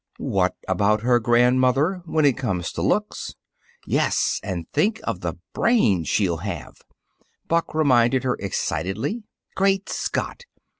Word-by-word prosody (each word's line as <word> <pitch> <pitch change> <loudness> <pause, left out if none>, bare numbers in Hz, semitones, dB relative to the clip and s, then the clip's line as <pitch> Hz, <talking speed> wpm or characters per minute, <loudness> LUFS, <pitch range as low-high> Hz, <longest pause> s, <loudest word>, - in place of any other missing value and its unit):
"What - - 0
about 105 +1 +2
her 120 +1 +3
grandmother, 130 - +3
when 155 -2 +1
it 135 -4 +4
comes 95 -10 -2
to - - -5
looks! - - -1 0.5
Yes, - - +1
and 90 -4 -4
think 220 +2 +1
of 115 -6 -3
the 85 -2 -4 0.2
brain 105 - +2
she'll 85 +1 +1
have," 95 +1 -7 0.7
Buck 165 -1 0
reminded 130 -4 +3
her 130 - +1
excitedly. 95 - -2 0.3
"Great 195 0 +1
Scott! 485 - -3
120 Hz, 130 wpm, -23 LUFS, 95-155 Hz, 0.7 s, it